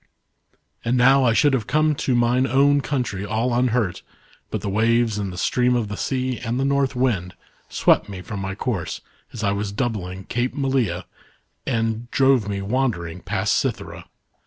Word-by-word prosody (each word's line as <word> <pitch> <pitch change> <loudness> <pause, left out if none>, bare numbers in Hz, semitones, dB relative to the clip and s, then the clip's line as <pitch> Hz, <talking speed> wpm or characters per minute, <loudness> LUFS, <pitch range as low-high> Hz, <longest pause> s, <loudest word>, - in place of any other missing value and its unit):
" - - -43
And 120 +2 +1
now 135 +2 +5
I 115 - +4
should 145 +4 +3
have 120 -5 0
come 155 +1 +2
to 135 -3 -1
mine 120 +2 +2
own 140 +2 +4
country 125 -9 -2
all 115 +4 -1
unhurt, 120 -6 +1 0.5
but - - -3
the 105 - -4
waves 115 +1 +2
and 100 -2 -3
the 90 - -8
stream 125 +6 +2
of 115 -4 -1
the 105 - -4
sea 130 0 -2
and 120 +1 -2
the 135 - +1
North 140 -1 +1
Wind 110 -8 0 0.3
swept - - +2
me 95 -2 -7
from 105 +1 -6
my 95 0 -4
course 105 -6 -3 0.3
as 115 - -6
I 100 - +2
was 100 0 -2
doubling 100 -5 -3
Cape 120 +6 -2
Malea 135 -5 0 0.6
and 115 -2 -1
dxave 130 -6 +3
me 100 -1 -3
wandering 100 -7 -1
past - - 0
Cythera. - - -3
120 Hz, 180 wpm, -22 LUFS, 100-130 Hz, 0.6 s, now